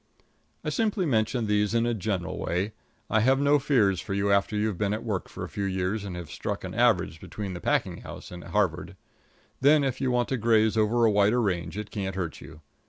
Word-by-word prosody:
I -, -, -1 dB
simply 215 Hz, -4 st, 0 dB
mention 115 Hz, -3 st, +1 dB
these 105 Hz, 0 st, +1 dB
things 115 Hz, -, +3 dB
in 115 Hz, -, +1 dB
a 120 Hz, -, +1 dB
general 95 Hz, -3 st, -3 dB
way. 90 Hz, +5 st, -1 dB, 0.4 s
I 110 Hz, -, +2 dB
have 130 Hz, +5 st, +3 dB
no 145 Hz, +1 st, +4 dB
fears 105 Hz, -, +2 dB
for 100 Hz, -, -4 dB
you 100 Hz, 0 st, +1 dB
after 100 Hz, +2 st, +2 dB
you've 105 Hz, -3 st, -1 dB
been 105 Hz, 0 st, +1 dB
at 110 Hz, -, -6 dB
work 100 Hz, -7 st, -3 dB
for -, -, -7 dB
a -, -, -4 dB
few 100 Hz, -, -4 dB
years, 95 Hz, +2 st, -1 dB
and 95 Hz, -3 st, -6 dB
have 85 Hz, -2 st, -7 dB
struck -, -, -4 dB
an -, -, -6 dB
average 80 Hz, -, +2 dB
between 95 Hz, +1 st, -6 dB
the 85 Hz, -, -7 dB
packing -, -, 0 dB
house -, -, -10 dB
and 90 Hz, -1 st, -8 dB
Harvard; 95 Hz, -2 st, -1 dB, 0.6 s
then 145 Hz, +2 st, +5 dB
if 135 Hz, -2 st, -2 dB
you 130 Hz, -, +1 dB
want 125 Hz, -1 st, +1 dB
to 130 Hz, -, 0 dB
graze 110 Hz, -2 st, +3 dB
over 110 Hz, +2 st, +3 dB
a 110 Hz, -, +4 dB
wider 105 Hz, +4 st, +3 dB
range 95 Hz, -4 st, -1 dB
it 105 Hz, -1 st, -5 dB
can't 95 Hz, -3 st, -3 dB
hurt 85 Hz, -5 st, -4 dB
you. 75 Hz, -, -12 dB
105 Hz, 230 wpm, -27 LUFS, 95-120 Hz, 0.6 s, then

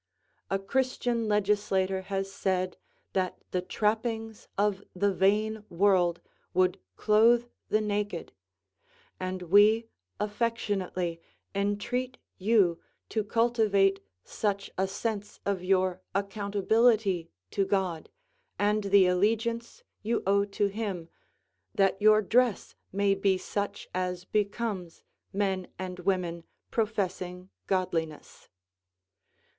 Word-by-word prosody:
A 195 Hz, -, +1 dB
Christian 240 Hz, +2 st, 0 dB
legislator 195 Hz, -2 st, +1 dB
has 195 Hz, 0 st, -3 dB
said 185 Hz, -1 st, -1 dB, 0.4 s
that 185 Hz, -1 st, 0 dB
the 180 Hz, -, 0 dB
trappings 220 Hz, +3 st, -2 dB
of 200 Hz, -1 st, +1 dB
the 200 Hz, +2 st, +2 dB
vain 210 Hz, +3 st, +2 dB
world 175 Hz, -1 st, +3 dB, 0.3 s
would 185 Hz, 0 st, +3 dB, 0.2 s
clothe 230 Hz, -, +4 dB, 0.2 s
the 215 Hz, -, +3 dB
naked, 205 Hz, 0 st, -2 dB, 0.9 s
and 185 Hz, 0 st, -3 dB
we 205 Hz, +5 st, +5 dB, 0.3 s
affectionately 205 Hz, -5 st, -1 dB, 0.3 s
entreat 205 Hz, +6 st, -1 dB, 0.2 s
you 190 Hz, -4 st, +3 dB, 0.3 s
to 220 Hz, -, 0 dB
cultivate 210 Hz, -3 st, +2 dB, 0.2 s
such 200 Hz, -2 st, -2 dB
a 190 Hz, +1 st, +1 dB
sense 205 Hz, +1 st, -4 dB
of 195 Hz, -3 st, -1 dB
your 185 Hz, -1 st, +2 dB
accountability 200 Hz, -1 st, +2 dB, 0.2 s
to 200 Hz, -, +1 dB
God, 190 Hz, -5 st, -1 dB, 0.5 s
and 210 Hz, 0 st, +1 dB
the 200 Hz, -1 st, +6 dB
allegiance 225 Hz, +6 st, 0 dB, 0.2 s
you 225 Hz, +2 st, -1 dB
owe 200 Hz, +1 st, +3 dB
to 205 Hz, 0 st, 0 dB
Him, 200 Hz, -5 st, -3 dB, 0.7 s
that 195 Hz, 0 st, +2 dB
your 215 Hz, 0 st, +6 dB
dress 240 Hz, +1 st, +2 dB, 0.2 s
may 200 Hz, +1 st, +2 dB
be 195 Hz, -1 st, +2 dB
such 200 Hz, +2 st, -4 dB
as 180 Hz, -1 st, -2 dB
becomes 200 Hz, -4 st, -2 dB, 0.3 s
men 190 Hz, -2 st, -1 dB
and 180 Hz, -1 st, -5 dB
women 175 Hz, -2 st, -1 dB, 0.3 s
professing 185 Hz, -4 st, -2 dB, 0.2 s
godliness. 165 Hz, -5 st, -2 dB
200 Hz, 105 wpm, -29 LUFS, 185-215 Hz, 0.9 s, the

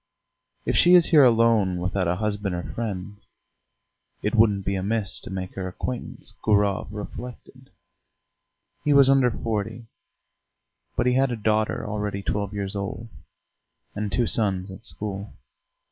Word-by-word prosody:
"If -, -, 0 dB
she 175 Hz, +1 st, +7 dB
is 175 Hz, -2 st, +5 dB
here 150 Hz, -4 st, +8 dB
alone 115 Hz, -6 st, +4 dB
without 90 Hz, +1 st, -1 dB
a 85 Hz, -, +1 dB
husband 100 Hz, -1 st, -2 dB
or 85 Hz, -, -4 dB
friends, 105 Hz, -2 st, -6 dB, 0.9 s
it 105 Hz, -, 0 dB
wouldn't 105 Hz, -4 st, +3 dB
be 100 Hz, -, 0 dB
amiss 100 Hz, +2 st, -1 dB
to -, -, -11 dB
make 95 Hz, -1 st, -5 dB
her 95 Hz, -1 st, -4 dB
acquaintance," 125 Hz, +7 st, -5 dB
Gurov 100 Hz, -2 st, +2 dB
reflected. 125 Hz, +4 st, -9 dB, 1.1 s
He 145 Hz, -, +3 dB
was 140 Hz, -1 st, +6 dB
under 135 Hz, -2 st, +4 dB
forty, 115 Hz, 0 st, -3 dB, 1.1 s
but -, -, +1 dB
he 125 Hz, -, +3 dB
had 135 Hz, +1 st, +3 dB
a 120 Hz, -, -2 dB
daughter 110 Hz, 0 st, 0 dB
already 105 Hz, -2 st, -3 dB
twelve 100 Hz, -1 st, -2 dB
years 100 Hz, -1 st, -2 dB
old, 100 Hz, +3 st, -5 dB, 0.8 s
and 105 Hz, -1 st, -3 dB
two 120 Hz, +5 st, +2 dB
sons 95 Hz, -4 st, +1 dB
at 95 Hz, -, -11 dB
school. 100 Hz, -1 st, -4 dB
105 Hz, 145 wpm, -25 LUFS, 100-115 Hz, 1.1 s, here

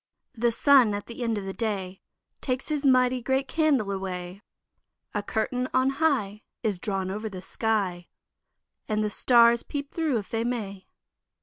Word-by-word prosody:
The 235 Hz, -1 st, +1 dB
sun 250 Hz, -3 st, +5 dB
at 205 Hz, -, -5 dB
the 235 Hz, +1 st, -9 dB
end 230 Hz, -2 st, 0 dB
of 200 Hz, -, -4 dB
the 195 Hz, -, -4 dB
day 195 Hz, -5 st, -3 dB, 0.4 s
Takes 255 Hz, +1 st, -2 dB
his 300 Hz, -2 st, -1 dB
mighty 255 Hz, -1 st, +4 dB
great 265 Hz, +2 st, 0 dB
candle 285 Hz, -11 st, +1 dB
away; 185 Hz, -1 st, -5 dB, 0.7 s
A 205 Hz, -, -1 dB
curtain 250 Hz, +5 st, -2 dB
on 260 Hz, +1 st, +3 dB
high 270 Hz, -9 st, 0 dB, 0.2 s
Is 205 Hz, -5 st, 0 dB
drawn 190 Hz, -2 st, -2 dB
over 215 Hz, +2 st, -4 dB
the 185 Hz, -2 st, -8 dB
sky, 190 Hz, -5 st, -1 dB, 0.8 s
And 215 Hz, 0 st, +1 dB
the 210 Hz, -, -1 dB
stars 235 Hz, +1 st, +5 dB
peep 285 Hz, -1 st, -6 dB
thro' 315 Hz, -7 st, 0 dB
if 205 Hz, -, -5 dB
they 225 Hz, 0 st, 0 dB
may. 210 Hz, -6 st, -4 dB
225 Hz, 165 wpm, -26 LUFS, 200-255 Hz, 0.8 s, sun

